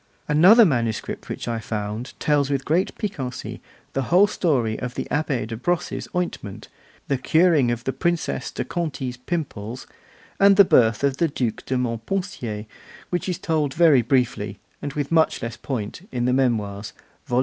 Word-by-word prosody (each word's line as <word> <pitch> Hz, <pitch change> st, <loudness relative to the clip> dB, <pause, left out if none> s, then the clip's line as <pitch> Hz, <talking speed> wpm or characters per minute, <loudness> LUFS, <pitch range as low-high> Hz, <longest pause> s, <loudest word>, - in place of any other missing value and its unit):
Another 185 Hz, +10 st, +7 dB
manuscript 120 Hz, -, -2 dB
which -, -, -5 dB
I 115 Hz, -1 st, -1 dB
found 110 Hz, +2 st, -5 dB
tells 145 Hz, -2 st, +2 dB
with 140 Hz, -2 st, -1 dB
great 170 Hz, +5 st, 0 dB
piquancy 140 Hz, -, -5 dB, 0.3 s
the 135 Hz, -, 0 dB
whole 180 Hz, +4 st, +6 dB
story 130 Hz, -, 0 dB
of 125 Hz, -1 st, -5 dB
the -, -, -2 dB
Abbé 145 Hz, -6 st, 0 dB
de 115 Hz, +1 st, -5 dB
Brosses' 175 Hz, +9 st, -2 dB
ointment, 175 Hz, -, -4 dB, 0.4 s
the 135 Hz, -2 st, 0 dB
curing 160 Hz, -2 st, +3 dB
of 120 Hz, 0 st, -2 dB
the 135 Hz, -, -2 dB
Princess 170 Hz, -1 st, -1 dB
de -, -, -4 dB
Conti's 135 Hz, -7 st, -3 dB
pimples, 125 Hz, -6 st, -4 dB, 0.5 s
and 200 Hz, 0 st, +7 dB
the 200 Hz, 0 st, +8 dB
birth 115 Hz, -6 st, +4 dB
of 140 Hz, -1 st, +1 dB
the 170 Hz, -, +2 dB
Duc 125 Hz, -6 st, -3 dB
de 130 Hz, -, 0 dB
Montpensier, 120 Hz, -, -3 dB, 0.5 s
which 180 Hz, +1 st, -1 dB
is 180 Hz, -, -1 dB
told 155 Hz, -4 st, -1 dB
very 160 Hz, -6 st, +6 dB
briefly, 115 Hz, -5 st, 0 dB, 0.2 s
and 145 Hz, -, -4 dB
with 145 Hz, 0 st, -3 dB
much 160 Hz, -6 st, +2 dB
less 115 Hz, 0 st, -4 dB
point, 130 Hz, -, -5 dB
in 120 Hz, -2 st, -1 dB
the 125 Hz, -, +2 dB
Memoirs 110 Hz, -6 st, 0 dB, 0.3 s
(vol. 125 Hz, -, +2 dB
135 Hz, 165 wpm, -23 LUFS, 115-165 Hz, 0.5 s, the